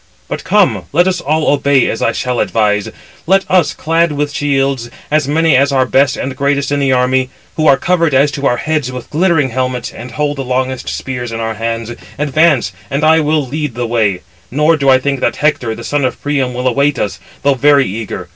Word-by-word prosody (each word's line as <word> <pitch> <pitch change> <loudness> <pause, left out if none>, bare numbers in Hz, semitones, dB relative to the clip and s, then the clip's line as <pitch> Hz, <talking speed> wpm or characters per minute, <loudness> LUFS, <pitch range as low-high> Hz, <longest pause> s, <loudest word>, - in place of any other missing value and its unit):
But - - -5
come? - - +2
let 175 +4 +3
us 185 -2 -1
all 155 +2 0
obey 140 -2 +2
as 115 - -3
I 115 - +2
shall 125 +1 -2
advise. 105 -2 0 0.4
Let 195 +1 +3
us, 180 -4 +3
clad 165 +1 +1
with 145 0 -2
shields, 135 -4 -1 0.2
as 155 -2 +2
many 160 0 +2
as 140 +2 +3
are 130 -2 +2
best 135 0 +2
and 130 0 -4
greatest 140 0 0
in 145 - +1
the 135 -1 +1
army, 130 0 +1 0.3
who 155 -1 +1
are 140 -2 +6
covered 170 -5 +1
as 140 +2 +3
to 140 -1 -1
our 120 - +1
heads 150 -4 -2
with 125 -1 -8
glittering 160 -4 +2
helmets, 125 0 -3
and 125 - -9
hold 145 +3 -2
the 135 - -3
longest 130 0 -2
spears 125 -3 -5
in 115 - -4
our 115 0 -2
hands, 115 +1 -4 0.3
advance, 150 - +2 0.2
and 140 +3 -2
I 160 +1 +5
will 150 -1 +1
lead 145 -1 -4
the 120 0 -2
way; 110 -6 0 0.3
nor 150 +5 +2
do 140 -3 +1
I 130 - +6
think 140 +1 -2
that 120 - 0
Hector, 125 -7 0
the 115 - -9
son 145 +2 -1
of 130 - -1
Priam, 135 -4 -1
will 125 +1 -1
await 140 +3 +1
us, 100 -2 -3 0.2
though 140 0 +4
very 140 +1 +4
eager. 105 +2 -5
140 Hz, 215 wpm, -14 LUFS, 125-150 Hz, 0.4 s, are